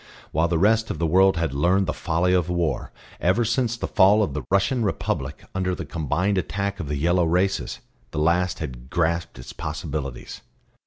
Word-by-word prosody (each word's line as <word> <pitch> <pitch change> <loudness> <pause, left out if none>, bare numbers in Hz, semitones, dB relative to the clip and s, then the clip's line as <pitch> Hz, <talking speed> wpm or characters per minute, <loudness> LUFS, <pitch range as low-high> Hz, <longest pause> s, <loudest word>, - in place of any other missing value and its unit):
While 80 +3 +2
the 85 -1 0
rest 110 +5 +3
of - - -3
the 85 - 0
world 95 +3 +4
had 80 -4 -1
learned 90 +7 +2
the 90 - -2
folly 90 +2 0
of 90 -2 +1
war, 85 -6 -1 0.3
ever 95 +7 +2
since 120 0 0
the - - -3
fall 105 +3 +5
of 75 - -2
the 75 - -3
Russian 100 +6 +2
republic 70 -8 -2
under 95 -1 -1
the 80 - -6
combined 85 +6 0
attack 100 +3 -3
of 75 - -4
the 75 0 -2
yellow 85 +4 +2
races, 90 +4 0 0.3
the 80 - -8
last 85 +3 +2
had 65 -5 -7
grasped 85 -3 -1
its 60 - -9
possibilities. 70 -5 -5
90 Hz, 190 wpm, -24 LUFS, 80-95 Hz, 0.3 s, fall